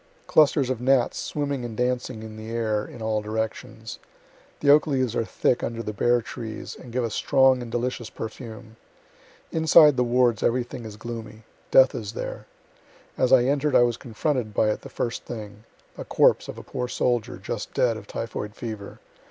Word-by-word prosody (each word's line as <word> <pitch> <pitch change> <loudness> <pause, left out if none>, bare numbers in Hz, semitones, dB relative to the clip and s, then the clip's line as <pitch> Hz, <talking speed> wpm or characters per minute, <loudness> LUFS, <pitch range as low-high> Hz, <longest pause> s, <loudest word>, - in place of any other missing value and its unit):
Clusters 145 -4 +4
of 125 -2 -3
gnats 130 -1 +2
swimming 140 -3 -3
and 115 -2 -6
dancing 125 -2 -1
in 110 -1 -9
the 110 +1 -8
air 110 -2 -1
in 115 - -9
all 110 -1 0
directions. 110 +1 -5 0.6
The 140 - +5
oak 150 +2 +5
leaves 130 -5 0
are - - +1
thick 120 +2 0
under 115 0 -3
the 105 - -4
bare 120 +3 +2
trees, 110 -1 -7
and 125 - -12
give 125 +1 -1
a 115 - -2
strong 130 +3 +3
and 120 -1 -7
delicious 120 -1 -2
perfume. 110 0 -8 0.7
Inside 160 -3 +6
the 125 - +3
wards 120 -2 +2
everything 120 -1 -1
is 105 -1 -8
gloomy. 110 -1 -8 0.3
Death 130 0 +6
is 110 -4 -5
there. - - -6 0.7
As 130 - +1
I 130 -2 +7
enter'd, 140 +2 +1
I - - +7
was 120 -1 +1
confronted 120 -2 -2
by 110 - +3
it - - -4
the - - -10
first 115 -1 -3
thing; 105 -2 -8 0.3
a - - -3
corpse - - +3
of - - -7
a - - -8
poor 125 0 -4
soldier, 120 -2 -1
just - - -5
dead, 120 -3 +2
of 105 -2 -9
typhoid 105 -2 -5
fever. 110 -4 -7
120 Hz, 185 wpm, -25 LUFS, 110-130 Hz, 0.7 s, I